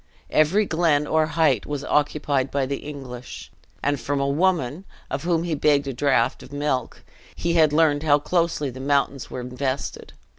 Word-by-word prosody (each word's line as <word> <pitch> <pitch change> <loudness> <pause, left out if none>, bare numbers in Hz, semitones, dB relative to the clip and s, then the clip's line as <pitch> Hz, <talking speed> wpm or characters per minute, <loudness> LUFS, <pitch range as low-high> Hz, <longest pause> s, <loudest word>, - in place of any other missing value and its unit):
Every 180 +8 +3
glen 160 -4 +2
or 155 0 +2
height 155 -8 +1
was 145 -1 -3
occupied 145 -2 0
by 140 -1 0
the 140 +1 -3
English: 130 -4 -9 0.3
and 145 -1 +1
from 140 +4 -2
a 140 - 0
woman, 160 0 +1 0.3
of 135 +4 -3
whom 170 -2 +1
he 170 -2 -2
begged 145 -1 +2
a 135 - -2
draught 130 -2 +1
of - - -13
milk, 145 -4 -2 0.3
he 170 - -1
had 160 -3 +4
learned 150 -2 +3
how 150 -2 +4
closely 160 -2 0
the 130 - -10
mountains 140 -1 0
were 125 - -5
invested. 130 +2 -4
145 Hz, 175 wpm, -23 LUFS, 135-160 Hz, 0.3 s, had